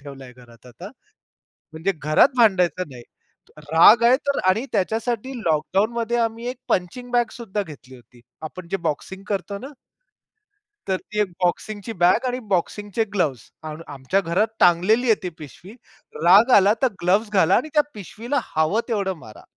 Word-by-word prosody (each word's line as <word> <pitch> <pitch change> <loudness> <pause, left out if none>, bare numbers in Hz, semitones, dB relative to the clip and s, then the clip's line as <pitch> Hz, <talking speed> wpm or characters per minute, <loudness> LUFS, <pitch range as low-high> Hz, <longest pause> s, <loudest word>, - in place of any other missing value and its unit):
ठेवलाय 135 -3 -11
घरात 120 -1 -18
आता, 120 -2 -11 0.9
म्हणजे 160 +5 -1
घरात 155 - +4
भांडायचं 185 -6 +2
नाही. 125 -2 -11 0.7
राग 210 +8 +7
आहे 240 +2 +6
तर 280 - +1
आणि 220 +7 +1
त्याच्यासाठी 225 +5 -2
लॉकडाउनमध्ये 215 +9 0
आम्ही 230 +1 -2
एक 255 - -6
पंचिंग 245 +8 -2
बॅग 240 -1 +2
सुद्धा 210 -4 -4
घेतली 140 -6 -13
होती. 120 0 -20 0.2
आपण 170 +2 -8
जे 195 - 0
बॉक्सिंग 190 +6 -5
करतो 200 0 -3
ना 260 - -8 1.2
तर 190 -1 0
ती 210 +3 -7
एक 205 - -1
बॉक्सिंगची 205 +5 -2
बॅग 200 +8 +4
आणि 250 0 -2
बॉक्सिंगचे 205 +4 -1
ग्लोव्ह्ज 150 - 0 0.2
आणि 155 -1 -6
आम - - -8
आमच्या 140 +8 -1
घरात 185 +5 0
टांगलेली 185 +8 +4
आहे 220 - +6
ती 180 - -3
पिशवी, 155 - -12 0.5
राग 195 +8 +6
आला 200 +1 +5
तर 260 - +4
ग्लोव्ह्ज 195 +5 +2
घाला 185 -5 +4
आणि 285 +7 0
त्या 300 - +5
पिशवीला 225 +7 -4 0.2
हवं 160 +7 +2
तेवढं 200 -5 -1
मारा. 110 -8 -14
195 Hz, 160 wpm, -22 LUFS, 160-225 Hz, 1.2 s, राग